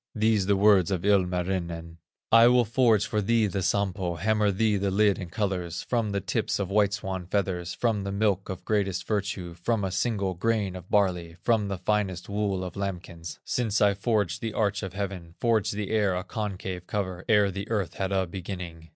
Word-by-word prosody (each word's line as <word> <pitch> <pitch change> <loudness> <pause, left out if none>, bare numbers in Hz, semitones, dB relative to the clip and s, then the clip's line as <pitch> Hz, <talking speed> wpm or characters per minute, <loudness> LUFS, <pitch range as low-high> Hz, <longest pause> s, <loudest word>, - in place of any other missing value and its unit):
These 110 -3 +2
the 100 - +4
words 100 -3 +5
of 95 -2 -2
Ilmarinen: 90 -3 0 0.3
"I 115 +1 +8
will 125 0 +5
forge 115 -2 +3
for 105 -2 -1
thee 115 +2 +2
the 100 -1 -2
Sampo, 95 -2 0
Hammer 105 +4 +2
thee 105 +2 +2
the 100 0 0
lid 100 +1 +3
in 90 -3 -6
colors, 90 -4 -2
From 115 -3 0
the 100 - 0
tips - - -1
of 100 -2 -3
white 100 -1 +3
swan 95 -2 -4
feathers, 90 -3 -1
From 115 -4 0
the 100 0 -4
milk 100 -1 0
of 90 -1 -6
greatest 100 -4 0
virtue, 100 -4 -2
From 100 +5 -1
a 95 - -1
single 100 -1 0
grain 100 0 0
of 90 0 -10
barley, 90 -5 +1
From 110 -4 +2
the 100 -1 -3
finest 95 -1 -1
wool 100 -2 -1
of 90 -2 -6
lambkins, 90 -4 -5
Since 110 -4 0
I 100 -1 +4
forged 100 -3 0
the 115 -2 -3
arch 105 -1 0
of 95 -3 -5
heaven, 95 -4 -5
Forged 110 -4 +1
the 105 -1 -3
air 105 -4 +2
a 90 - -2
concave 95 -4 -5
cover, 95 -3 -3
Ere 105 -2 +4
the 100 +3 -6
earth 105 -6 -1
had 95 0 -3
a 95 -1 +1
beginning." 85 -2 -7
100 Hz, 195 wpm, -27 LUFS, 90-105 Hz, 0.3 s, I